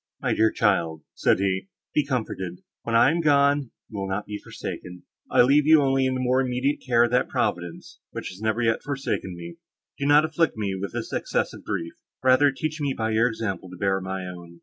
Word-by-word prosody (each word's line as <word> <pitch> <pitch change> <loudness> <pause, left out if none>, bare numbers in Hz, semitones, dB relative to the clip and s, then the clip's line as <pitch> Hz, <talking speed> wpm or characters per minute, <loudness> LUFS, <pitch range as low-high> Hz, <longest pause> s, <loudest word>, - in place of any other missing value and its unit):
"My - - 0
dear 110 0 +4
child," 85 -7 +1
said - - +2
he, 95 0 -1 0.3
"be 150 - +3
comforted. 110 -9 -4 0.2
When 115 - -2
I 115 +4 +6
am 170 +1 0
gone, 140 -3 +3 0.2
you 105 - -7
will 95 0 -3
not 100 +2 -2
be 105 0 -6
forsaken—I 90 +6 -2
leave 140 +3 +4
you 160 0 +8
only 135 -1 +2
in 130 - -1
the - - -2
more 130 +1 +2
immediate 130 +3 0
care 120 -2 +4
of 120 - +1
that 125 +1 +2
Providence, 85 -1 -3
which - - -6
has 95 +2 -11
never 110 +2 0
yet 115 -1 +1
forsaken 135 -9 -3
me. 85 0 -9 0.4
Do 140 - 0
not 145 +1 +6
afflict 160 -4 0
me 100 -3 -1
with 95 +1 -5
this - - -5
excess - - -1
of - - -11
grief; 85 0 -3 0.3
rather 130 +2 +5
teach 155 +3 -4
me 140 -2 -1
by 110 0 -1
your 110 +2 +3
example 100 -6 -4
to 90 - -10
bear 95 +1 0
my 95 0 -4
own." 85 -1 -10
115 Hz, 215 wpm, -25 LUFS, 95-135 Hz, 0.4 s, you